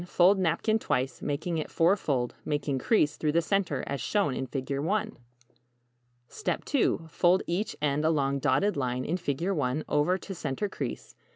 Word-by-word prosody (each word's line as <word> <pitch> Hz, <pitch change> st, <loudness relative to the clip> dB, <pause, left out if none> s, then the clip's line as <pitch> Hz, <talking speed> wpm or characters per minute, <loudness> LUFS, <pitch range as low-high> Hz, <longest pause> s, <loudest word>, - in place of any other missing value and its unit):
Fold 185 Hz, +3 st, +4 dB
napkin 215 Hz, +5 st, +1 dB
twice, 130 Hz, -9 st, -1 dB
making 160 Hz, +3 st, -2 dB
it 155 Hz, -, -4 dB
fourfold. 155 Hz, -8 st, +1 dB
Make 145 Hz, -1 st, -1 dB, 0.2 s
crease 150 Hz, -, +2 dB
through 150 Hz, -1 st, 0 dB
the 170 Hz, -, +4 dB
center, 190 Hz, -7 st, 0 dB
as 140 Hz, -, -3 dB
shown 200 Hz, -10 st, +1 dB
in 130 Hz, +1 st, -3 dB
=Figure 135 Hz, +1 st, -3 dB
I= 215 Hz, +1 st, 0 dB, 1.2 s
2. 280 Hz, -, 0 dB
Fold 175 Hz, +3 st, +3 dB
each 180 Hz, +6 st, -2 dB
end 145 Hz, +1 st, +1 dB
along 140 Hz, -3 st, +1 dB
dotted 145 Hz, +10 st, +2 dB
line 125 Hz, -2 st, -1 dB
in 175 Hz, -, 0 dB
=Figure 175 Hz, +3 st, -1 dB
I= 130 Hz, +4 st, -1 dB
over 150 Hz, +6 st, +2 dB
to 195 Hz, -, -7 dB
center 150 Hz, +3 st, -2 dB
crease. -, -, -6 dB
155 Hz, 160 wpm, -28 LUFS, 140-190 Hz, 1.2 s, Fold